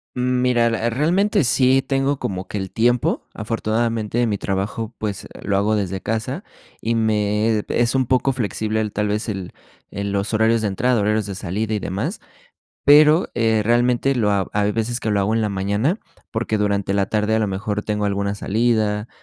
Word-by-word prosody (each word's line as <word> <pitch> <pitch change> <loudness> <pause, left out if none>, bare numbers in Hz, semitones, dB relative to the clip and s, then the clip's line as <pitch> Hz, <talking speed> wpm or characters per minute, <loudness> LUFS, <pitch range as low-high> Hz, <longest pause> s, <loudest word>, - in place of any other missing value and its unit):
Mm, 125 0 0
mira, 120 -2 +3
eh, 115 0 0
realmente 170 - +2
sí 130 +2 +3
tengo 135 +1 0
como 95 -1 -4
que 105 - -4
el 95 - -4
tiempo, 120 +1 +1
afortunadamente, 115 +1 -1
mi 105 -2 -1
trabajo, 105 +4 -3
pues, 105 -3 -4
lo 100 -1 0
hago 105 +2 +2
desde 95 -2 -2
casa 125 - -3 0.4
y 115 +1 0
me 105 0 +1
es 120 +2 +1
un 130 -1 +2
poco 130 +2 +2
flexible 110 -2 -2
el, 105 -2 -2
tal 105 0 0
vez, 105 +3 -2
el 95 -4 -5 0.4
el 100 +1 -4
los 100 +2 -2
horarios 110 +1 +3
de 105 - 0
entrada, 120 +4 +1
horarios 105 0 +1
de 100 - -5
salida 105 +3 -3
y - - -1
demás, 105 - -3 0.7
pero, 150 +3 +6
eh, 110 -2 +2
realmente 120 +3 +2
lo 105 -4 +1
ha 100 -2 +1
hay 105 0 +1
veces 115 +2 -2
que 110 - -2
lo 100 - +2
hago 105 +3 +1
en 115 - +1
la 105 - 0
mañana, 100 - 0 0.3
porque 110 -1 -1
durante 100 -1 0
la 100 -1 +1
tarde 105 +1 0
a - - +3
lo 105 - +1
mejor 105 +2 -2
tengo 105 -1 -1
alguna 100 0 -1
salida, 110 0 0
110 Hz, 190 wpm, -21 LUFS, 105-120 Hz, 0.7 s, pero